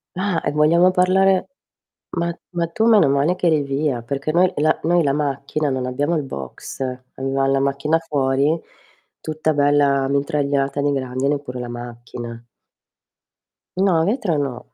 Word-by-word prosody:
Ah, 185 -2 0
e - - +1
vogliamo 165 +5 +4
parlare 185 +1 +3 0.7
ma 170 0 0 0.2
ma 170 -2 -1
tu 220 +7 -1
meno 215 -10 +5
male 140 +5 +2
che 180 -1 0
eri 155 -3 +3
via 140 -3 -1
perché 140 +4 -3
noi 180 +2 +3
la 155 +2 +2
noi 175 +2 +3
la 140 - +2
macchina 145 +1 -1
non 130 -1 -2
abbiamo 145 +6 0
il - - 0
box, 70 - -8 0.3
avevam 135 0 0
la 135 - +2
macchina 140 +3 +1
fuori, 145 0 0 0.6
tutta 155 0 -1
bella 145 -1 +3
mitragliata 140 0 0
di 145 - +2
grandine 135 +1 -1
pure 125 -3 -7
la 120 - -5
macchina. 120 -1 -8 1.3
No, 185 -4 +3
vetro 205 - 0
no, 125 -4 -4
145 Hz, 150 wpm, -21 LUFS, 135-165 Hz, 1.3 s, meno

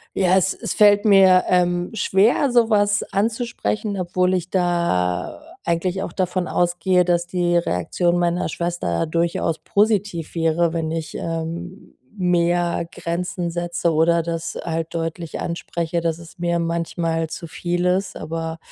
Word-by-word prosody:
ja, 185 -1 +3
es 190 +1 +2
es 225 -6 -4
fällt 205 0 +5
mir, 190 -3 +6
ähm, 175 -1 +1
schwer, 220 +6 +2
sowas 210 -4 +3
anzusprechen, 210 - -1
obwohl 180 +1 +1
ich 180 -1 -1
da 170 - 0 0.2
eigentlich 180 +3 -1
auch 175 - -6
davon 185 -1 -1
ausgehe, 180 +1 +2
dass 175 0 +1
die 175 -1 0
Reaktion 170 - 0
meiner 175 0 0
Schwester 170 - -2
durchaus 165 0 -1
positiv 205 -5 0
wäre, 165 +1 +1
wenn 165 -1 -2
ich, 165 -1 -4
ähm, 165 +2 -5 0.2
mehr 175 -1 +1
Grenzen 175 +1 -3
setze 175 0 -1
oder 165 +1 +3
das 165 -1 -4
halt 165 -1 -3
deutlich 165 -1 -4
anspreche, 170 0 -3
dass 165 -1 -1
es 170 0 -14
mir 170 0 0
manchmal 165 -1 -1
zu 170 - -7
viel 175 +2 -2
ist. 185 +2 0
Aber, 165 0 -4
175 Hz, 140 wpm, -21 LUFS, 165-185 Hz, 0.2 s, mir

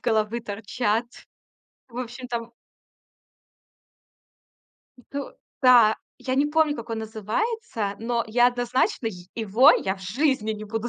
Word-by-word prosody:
головы 220 0 0
торчат. 220 +1 -1 0.9
В 235 - -10
общем 250 +1 -6
там 235 -1 -4 2.6
Ну 280 0 -5 0.3
да. 240 -4 +7 0.2
Я 260 -1 -2
не 285 +2 +3
помню, 300 -1 +2
как 230 0 -8
он 225 - -2
называется, 220 - -3
но 235 +1 -1
я 240 +2 +4
однозначно 245 -1 0
йе 180 -4 -10
его 225 +4 +5
я 190 0 -1
в - - -16
жизни 220 +2 0
не 215 0 -7
буду 225 +3 -3
235 Hz, 125 wpm, -25 LUFS, 215-255 Hz, 2.6 s, да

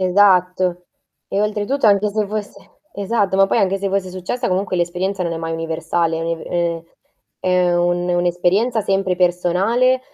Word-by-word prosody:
Esatto. 180 -1 +2 0.4
E 200 - -1
oltretutto 215 +4 +1
anche 205 +1 +3
se 210 +1 -1
fosse 210 -1 -6 0.2
esatto, 200 -1 -1
ma 195 0 +5
poi - - +1
anche 195 0 +1
se 195 0 -2
fosse 190 -1 -1
successa 185 +7 -3
comunque 185 -1 -1
l'esperienza 180 +2 -1
non 170 - -2
è 165 - -3
mai 165 0 -4
universale, 165 0 -1
è - - -4
uni 165 0 -3
ehm 170 -1 -2 0.6
È 180 -1 +2
un 175 0 0
un'esperienza 180 +6 +1
sempre 195 -2 0
personale 185 +9 +2
185 Hz, 160 wpm, -19 LUFS, 175-200 Hz, 0.6 s, ma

